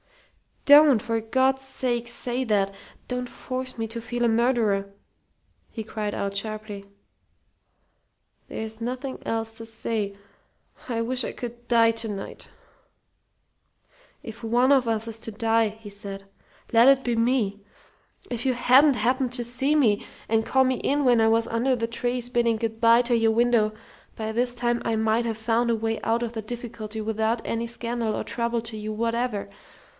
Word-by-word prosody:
"Don't, 290 -4 +8
for 230 0 -1
God's 260 +4 +1
sake, 245 -3 -2
say 245 +1 -2
that! 200 -3 +1 0.3
Don't 250 0 -3
force 255 -1 -5
me 225 -1 -2
to 230 +1 -6
feel 240 +1 -3
a - - +4
murderer!" 225 -4 +1 0.8
he 220 - -6
cried 210 -1 -4
out, 200 0 -3
sharply. 210 -1 -5 1.6
"There's 220 0 -6
nothing 255 +3 -4
else 225 0 -2
to 225 - -6
say. 220 -2 -3 0.7
I 230 -2 -1
wish 250 +2 -1
I - - -3
could 240 0 -8
die 230 -1 +5
to 225 0 -4
night." 200 -2 -7 1.8
"If 225 -3 -9
one 240 +4 +3
of 265 -4 +4
us 225 0 -1
is 225 0 -5
to 225 - -5
die," 225 +1 +2
he 215 0 -11
said, 200 -1 -7 0.5
"let 235 +2 +6
it 270 -1 +5
be 240 -1 0
me. 230 -4 +1 0.7
If 240 0 -4
you 260 - +3
hadn't 265 +4 +5
happened 250 +3 0
to 245 -1 +2
see 250 +5 +1
me 225 -9 +3 0.3
and 225 0 +2
call 265 0 +3
me 260 0 +1
in 285 +4 0
when 240 -2 +5
I 225 - +4
was 225 +1 +3
under 245 +3 +1
the 230 -1 -2
trees 245 +1 -2
bidding 235 -2 +2
good 225 0 -3
bye 230 +1 +6
to 240 0 +1
your 225 -1 +3
window, 230 -2 +2 0.4
by 220 0 -3
this 245 +2 -1
time 240 0 0
I 230 - +1
might 220 +2 +1
have 225 -2 -2
found 230 +2 +1
a 230 - +3
way 225 0 -2
out 230 +1 0
of 235 -1 -4
the 225 - -4
difficulty 220 -1 -6
without 220 +1 -1
any 230 0 -2
scandal 235 -1 -3
or - - -3
trouble 235 0 -2
to 225 -1 -7
you 215 0 -5
whatever. 230 -1 -1
230 Hz, 170 wpm, -25 LUFS, 220-245 Hz, 1.8 s, Don't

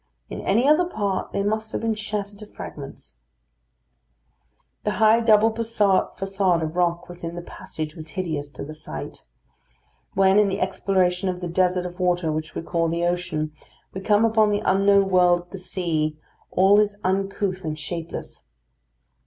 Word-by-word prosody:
In - - -5
any 230 +7 +2
other 305 +4 +5
part 205 - -2
they 200 - -1
must 220 +1 -1
have - - -3
been 225 0 +1
shattered 210 -1 -5
to 210 - -10
fragments. 140 - -10 1.6
The 210 - 0
high 220 +3 +5
double 225 -1 +5
façade 195 -5 +1
of 160 +1 -4
rock 175 -1 0
within 170 -1 -7
the 175 - -6
passage 155 -2 -7
was 155 -1 -8
hideous 155 -6 -2
to - - -7
the 155 - -8
sight. 75 - -8 0.9
When, 195 +1 +5
in 210 - +4
the 195 +1 -2
exploration 185 -1 +1
of 180 -1 -3
the 180 - -4
desert 180 +1 +1
of 180 +1 -7
water 175 -3 +1
which 155 0 -4
we - - -3
call 165 0 0
the 170 +1 0
ocean, 175 -3 -1 0.4
we 190 - -5
come 210 +2 +3
upon 220 -1 +4
the 205 0 0
unknown 195 +1 +4
world 180 -1 +4
of 175 - -22
the 195 - -6
sea, 160 -5 -2 0.3
all 195 +3 +5
is 205 -1 +1
uncouth 190 0 -1
and 155 -1 -3
shapeless. 165 +2 -6
185 Hz, 165 wpm, -24 LUFS, 170-205 Hz, 1.6 s, other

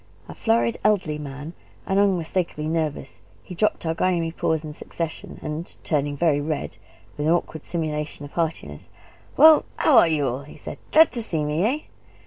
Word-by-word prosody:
A - - -8
florid, 115 +1 +1
elderly 190 -8 +1
man, 145 +2 -7 0.3
and 195 +1 +1
unmistakably 180 -5 0
nervous, 155 -4 -3 0.2
he 185 - -9
dropped 210 0 0
our 160 - +1
grimy 170 -1 0
paws 160 -1 -1
in 150 -1 -7
succession, 165 +1 -6
and, 155 +3 -6
turning 145 -2 -1
very 150 -2 +2
red, 150 0 -3 0.4
with 150 - 0
an - - +4
awkward 165 -2 -1
simulation 150 -3 -3
of 145 - -11
heartiness, 155 - -3 0.5
"Well, 310 +2 +9 0.2
h' - - -1
are 240 - +7
y' 160 -2 +1
all?" 135 -2 -1
he 140 - -13
said, - - -8
"Glad 320 +1 +7
to 235 -1 -3
see 165 -9 -2
me, 150 +4 0
eh?" 265 +7 +1
160 Hz, 175 wpm, -24 LUFS, 150-175 Hz, 0.5 s, Well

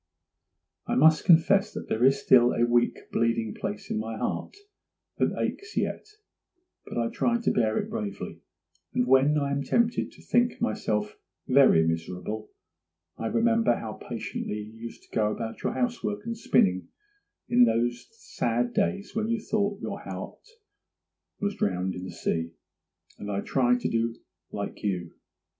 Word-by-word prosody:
'I - - 0
must 155 +3 +5
confess 195 +5 +5
that - - -6
there 110 - 0
is 135 +1 +5
still 125 -2 +5
a 120 - +2
weak, 120 0 +1
bleeding 115 -2 0
place 105 0 -5
in - - 0
my 110 0 -4
heart 380 - -3 0.6
that - - +1
aches 410 +2 -3
yet, - - -1 0.8
but - - -6
I 115 -1 +1
try 235 0 +1
to 235 - +1
bear 110 -2 +1
it - - -1
bravely; 100 -2 -5 0.5
and 125 - +2
when 135 +4 +4
I 140 -1 0
am 140 0 0
tempted 235 - +1
to - - -17
think 240 0 +2
myself 105 -1 -1 0.3
very 130 -12 +6
miserable, 90 +6 -3 0.7
I 115 - -2
remember 230 - +3
how - - -5
patiently - - -5
you 105 +1 -8
used 115 +1 -9
to - - -16
go 105 -1 +2
about 115 0 -5
your - - -1
housework 230 -4 -2
and 230 0 -3
spinning 95 - +2 0.6
in 245 0 +6
those 120 - 0
sad 120 - -2
days 200 +7 -1
when 220 -1 0
you 230 0 0
thought 205 -1 -1
your - - -4
heart - - -8 0.9
was 205 0 -1
drowned 95 - -1
in 90 - -6
the 95 - -6
sea; 85 -1 -2 0.7
and 105 - -6
I 100 0 -1
try 125 -2 +2
to - - -2
do 115 0 0 0.4
like 100 -1 -5
you. 90 -5 -2
120 Hz, 160 wpm, -27 LUFS, -, 0.9 s, very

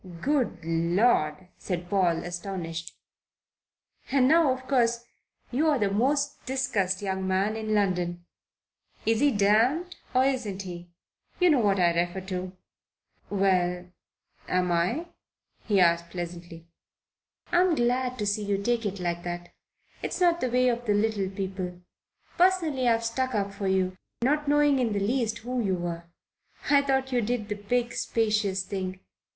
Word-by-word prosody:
"Good 260 - -1
Lord!" 170 0 +1
said 175 -2 -4
Paul, 175 -3 +1
astonished. 175 -2 -5 1.1
"And 260 -2 +4
now, 320 -1 +5
of 260 0 -4
course, 235 -3 +1 0.5
you're 295 +3 +2
the 205 -4 0
most 280 +7 0
discussed 220 -8 0
young 190 -1 -2
man 195 +3 +1
in 215 -1 -1
London. 175 -3 0 0.8
Is 225 0 +2
he 290 - +4
damned 240 - +2 0.2
or 255 +1 +5
isn't 225 -8 -1
he? 175 -1 -8 0.5
You 360 -2 +5
know 285 - +4
what 200 -4 +2
I 175 -1 +4
refer 175 +2 -1
to." 185 -1 -3 0.8
"Well, 180 -2 +1 0.6
am 180 -1 +1
I?' 180 - 0 0.6
he 205 -3 +3
asked 170 -1 +3
pleasantly. 170 -1 -7 0.9
"I'm 355 -1 +4
glad 250 0 0
to 210 - -2
see 205 +1 0
you 200 -1 0
take 230 +2 0
it 200 0 -5
like 175 -1 -2
that. 175 0 -6 0.5
It's - - -3
not 345 -1 +3
the 255 - 0
way 250 +1 +3
of 240 0 -1
the 205 - +3
little 205 -2 0
people. 185 -2 -5 0.6
Personally, 335 -8 +3
I've 230 -1 +2
stuck 255 +2 -1
up 200 -1 -1
for 200 0 -3
you, 185 -1 0 0.2
not 295 +3 +1
knowing 290 -1 +4
in 235 -4 +1
the 200 - 0
least 225 +1 0
who 250 0 -1
you 190 -2 +1
were. 170 -1 -4 0.7
I 285 -1 +6
thought 265 -1 0
you 245 -1 +2
did 220 -1 -2
the 210 - -1
big, 240 +4 -1
spacious 210 -4 0
thing. 185 -1 -4
205 Hz, 150 wpm, -27 LUFS, 185-255 Hz, 1.1 s, I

